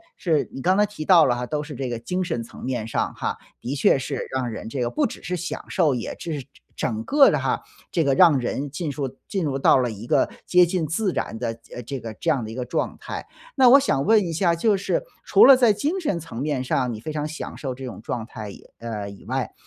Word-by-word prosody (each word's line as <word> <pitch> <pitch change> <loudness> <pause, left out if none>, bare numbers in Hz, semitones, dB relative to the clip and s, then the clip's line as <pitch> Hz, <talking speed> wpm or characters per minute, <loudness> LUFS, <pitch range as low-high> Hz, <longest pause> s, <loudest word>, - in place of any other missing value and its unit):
是 160 -5 0
你 135 - -6
刚 185 +5 +3
才 210 - +5
提 205 -6 -7
到 170 0 +6
了 120 - +2
哈， 125 - -3
都 150 +3 -2
是 150 0 -8
这 130 0 -3
个 120 - -3
精 180 +10 -2
神 160 -10 -2
层 115 - -12
面 125 -4 -2
上 - - -1
哈， - - -3 0.2
的 130 +4 -3
确 135 - +4
是 135 0 -4
让 125 -2 -1
人 110 - -6
这 125 +3 -3
个 120 - 0
不 120 - +1
只 - - -10
是 180 - -2
享 175 - -5
受， 155 -7 +2
也 120 - -4
这 165 - -4
是 - - -5
整 135 - -18 0.3
整 110 -3 -2
个 285 -1 +6
的 - - +1
哈， - - -1 0.3
这 165 - +2
个 140 -2 +2
让 155 -1 +6
人 135 +3 -3
进 150 +2 -4
树 135 -2 -4
进 190 -4 -2
入 135 -2 -1
到 135 - +5
了 125 -2 +1
一 110 0 -8
个 - - +2 0.2
接 180 0 +5
近 175 -2 -1
自 180 +5 -1
然 110 - -3
的， 120 - -2 0.3
呃， - - -6
这 135 +3 -5
个 115 -1 -6
这 165 - -2
样 140 -6 +2
的 110 - -6
一 - - -8
个 125 -1 -3
状 125 - -2
态。 - - -6 0.3
那 260 -3 +7
我 275 +3 +9
想 140 - +1
问 220 +1 +6
一 165 - -3
下， 170 +1 +2
就 205 +5 +2
是 195 - -1 0.2
除 415 - +6
了 275 - +10
在 245 -3 +5
精 295 - -1
神 200 - -1
层 155 -7 -7
面 145 -3 -1
上， 125 -1 0
你 110 - -6
非 155 +7 -6
常 150 -1 -2
享 155 +1 -6
受 130 -3 -4
这 130 +1 -8
种 120 - -8
状 115 0 -4
态 110 -3 -8
以 - - -12 0.2
呃， 105 -3 -5
以 100 - -12
外， - - -2
140 Hz, 285 characters per minute, -24 LUFS, 125-180 Hz, 0.3 s, 了